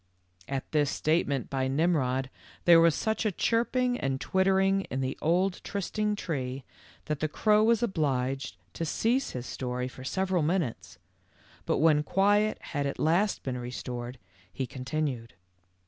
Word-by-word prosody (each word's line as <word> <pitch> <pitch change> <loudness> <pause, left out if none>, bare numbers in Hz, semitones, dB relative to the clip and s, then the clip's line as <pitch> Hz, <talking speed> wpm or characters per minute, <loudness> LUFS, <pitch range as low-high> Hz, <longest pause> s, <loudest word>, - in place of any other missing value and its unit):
At 135 -1 -4
this 150 -2 +2
statement 150 -5 0
by 130 -1 0
Nimrod 135 -3 +1 0.3
there 170 -1 +8
was 165 -2 +5
such 220 -1 -1
a 215 - +1
chirping 245 +5 +1
and 135 -1 -1
twittering 195 +2 +2
in 130 - -2
the 130 0 -2
old 180 +4 +1
trysting 210 +1 -2
tree 135 -8 -4 0.4
that 150 -2 -2
the 155 - 0
crow 210 +7 +3
was 230 0 +3
obliged 135 - -1 0.2
to - - -4
cease 235 - 0
his 125 -1 -5
story 125 -1 -3
for 130 0 -10
several 185 +4 0
minutes, 155 -5 -2 0.7
but - - +2
when 155 -1 +4
quiet 205 +6 +2 0.2
had 145 -1 0
at 140 - -4
last 175 +7 +1
been 125 -2 -3
restored, 125 0 -6 0.3
he 130 - -3
continued. 130 - -4
155 Hz, 145 wpm, -28 LUFS, 130-195 Hz, 0.7 s, there